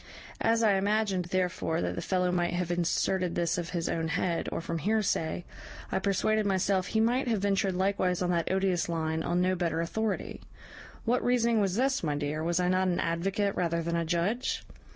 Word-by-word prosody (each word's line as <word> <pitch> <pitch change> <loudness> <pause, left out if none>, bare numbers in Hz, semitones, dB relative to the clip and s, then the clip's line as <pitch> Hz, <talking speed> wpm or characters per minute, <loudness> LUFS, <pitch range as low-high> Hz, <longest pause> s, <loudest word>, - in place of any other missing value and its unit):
As 230 0 +2
I 205 -3 +4
imagined, 200 -2 +1
therefore, 180 -2 -1
that - - -1
the - - -4
fellow 180 -1 +1
must 175 -1 0
have 175 -1 -1
inserted 175 +1 0
this 170 0 0
of 170 0 -4
his 170 -2 -2
own 165 -1 -1
head, 165 +1 -1
or - - -2
from 165 0 -3
hearsay, 185 -4 0 0.5
I - - +1
persuaded 205 +2 +1
myself 190 -1 +1
he 220 - 0
might 245 +4 +2
have 220 -4 +1
ventured 195 -2 +1
likewise 185 -1 +1
on 180 - +1
that 170 0 0
odious 190 -3 +1
line 160 -1 -1
on 175 +2 0
no 185 +1 +2
better 170 -3 -1
authority. 210 +5 -2 0.6
What 240 +2 +1
reasoning 235 -2 +2
was 195 -2 0
this, 265 +3 +1
my 150 -3 -1
dear? 145 +2 -2
was 170 +1 +1
I 180 - +1
not 185 +1 +2
an 175 -1 0
advocate 195 +4 0
rather 170 -1 0
than 170 +1 -1
a 170 - +1
judge? 175 +9 -1
180 Hz, 195 wpm, -29 LUFS, 170-200 Hz, 0.6 s, I